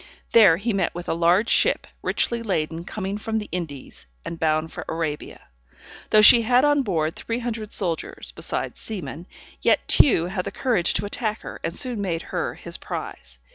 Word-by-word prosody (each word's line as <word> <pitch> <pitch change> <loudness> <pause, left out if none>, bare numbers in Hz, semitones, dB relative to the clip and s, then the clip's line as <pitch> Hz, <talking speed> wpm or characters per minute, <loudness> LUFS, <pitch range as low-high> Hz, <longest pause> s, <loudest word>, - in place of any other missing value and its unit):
There 200 -8 +7
he 220 +4 -2
met 190 -4 -1
with 175 0 -6
a - - 0
large 175 +6 +3
ship - - +2 0.2
richly 235 -1 0
laden 165 -5 -2
coming 200 +1 -4
from 220 +1 -2
the 210 - -4
Indies, 145 - -6 0.2
and 165 - -6
bound 155 0 0
for - - -6
Arabia. 160 -2 -5 0.6
Though 215 0 +6
she 235 +2 +9
had 245 +4 +3
on 290 -1 +3
board 165 - -1
three 230 - -4
hundred 230 -3 -4
soldiers, 170 -5 -2
besides - - -4
seamen, 175 -5 -7 0.3
yet - - +2
Tew 195 - +5
had 185 0 -3
the - - -4
courage 230 -10 +1
to - - 0
attack 215 +1 -3
her, - - -8
and 165 +2 -2
soon 245 -5 -1
made 170 -4 -2
her - - -2
his - - -7
prize. 60 - -7
190 Hz, 180 wpm, -23 LUFS, 165-225 Hz, 0.6 s, she